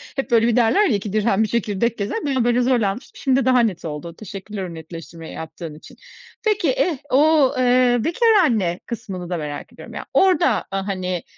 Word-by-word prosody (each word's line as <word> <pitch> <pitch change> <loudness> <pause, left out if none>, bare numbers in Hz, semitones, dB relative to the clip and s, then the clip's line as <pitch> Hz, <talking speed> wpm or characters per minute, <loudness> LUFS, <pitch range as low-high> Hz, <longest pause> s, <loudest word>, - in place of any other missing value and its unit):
hep, 270 -2 -3
böyle, 230 0 +4
bir 235 - +2
derler 250 - +4
ya, 215 - +2
"iki 200 0 -4
dirhem 215 0 +2
bir - - 0
çekirdek" 235 +1 -1
gezer. 220 - -3
Bir 275 -2 0
an, 250 - +2
böyle, 245 +1 +3
zorlanmıştım, 240 -2 0
şimdi 265 0 +2
daha 255 -1 +4
net 205 -8 0
oldu. 160 +2 -6
Teşekkürler 200 0 -7
o 175 -2 -6
netleştirmeyi 165 0 -9
yaptığın 160 0 -7
için. 155 - -15 0.5
Peki, 425 -1 +2
eh, 365 - 0
o, 295 0 +4
eee, 250 -1 +4
bekâr 455 +8 +2 0.2
anne 190 - 0
kısmını 195 -7 -6
da 175 - -2
merak 150 -2 -6
ediyorum - - -12
ya. - - -6
Orada, 370 -2 +3
hani, 185 -2 -3
220 Hz, 190 wpm, -21 LUFS, 185-255 Hz, 0.5 s, böyle